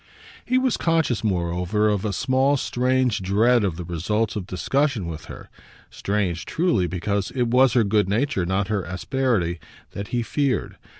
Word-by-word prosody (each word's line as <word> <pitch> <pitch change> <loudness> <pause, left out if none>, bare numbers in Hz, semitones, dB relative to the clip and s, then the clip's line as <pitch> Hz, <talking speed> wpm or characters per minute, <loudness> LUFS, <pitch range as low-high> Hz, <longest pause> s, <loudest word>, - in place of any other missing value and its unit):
He 255 - +1
was 255 -2 +1
conscious 160 -9 +1
moreover 90 +1 0
of 105 -3 0
a 105 - -1
small 130 +6 +2
strange 125 -4 0
dread 110 +5 +3
of 95 -5 -1
the 90 - -6
results 95 +6 -1
of 100 -3 -4
discussion 135 - 0
with 80 -2 -6
her - - -10 0.4
strange, 95 -4 -2
truly, 160 - +1
because 95 +3 -2
it 120 -2 +1
was 125 +1 +4
her 120 - +4
good 105 -1 +1
nature, 110 -2 0
not 95 +2 0
her 105 -2 0
asperity, 95 -1 -1 0.3
that 100 0 -6
he 120 -1 -1
feared. 135 -3 -1
105 Hz, 165 wpm, -23 LUFS, 95-130 Hz, 0.4 s, was